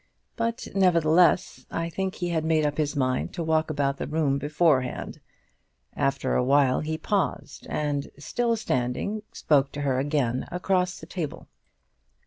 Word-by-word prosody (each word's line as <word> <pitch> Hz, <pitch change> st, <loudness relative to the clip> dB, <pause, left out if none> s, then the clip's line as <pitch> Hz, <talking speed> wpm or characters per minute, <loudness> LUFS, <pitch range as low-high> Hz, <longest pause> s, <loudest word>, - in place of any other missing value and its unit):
But, 230 Hz, +1 st, -2 dB
nevertheless, 175 Hz, -2 st, +3 dB
I 165 Hz, 0 st, -2 dB
think 190 Hz, +3 st, -3 dB
he 175 Hz, -1 st, -3 dB
had 160 Hz, -2 st, 0 dB
made 160 Hz, -1 st, +2 dB
up 145 Hz, +1 st, -1 dB
his 150 Hz, 0 st, 0 dB
mind 130 Hz, -2 st, 0 dB
to 170 Hz, -, -2 dB
walk 160 Hz, 0 st, +1 dB
about 140 Hz, -2 st, 0 dB
the -, -, -4 dB
room 150 Hz, -3 st, +1 dB
beforehand. 145 Hz, -3 st, 0 dB, 0.8 s
After 135 Hz, 0 st, 0 dB
a -, -, +2 dB
while 135 Hz, 0 st, +3 dB
he 155 Hz, +1 st, -2 dB
paused, 165 Hz, -7 st, -2 dB
and, 145 Hz, -2 st, -1 dB
still 230 Hz, +10 st, 0 dB
standing, 130 Hz, -, -1 dB
spoke 140 Hz, -2 st, +2 dB
to 145 Hz, -, -4 dB
her 135 Hz, -2 st, +1 dB
again 135 Hz, -3 st, 0 dB
across 180 Hz, 0 st, 0 dB
the -, -, -10 dB
table. 165 Hz, -6 st, -5 dB
155 Hz, 150 wpm, -26 LUFS, 140-175 Hz, 0.8 s, nevertheless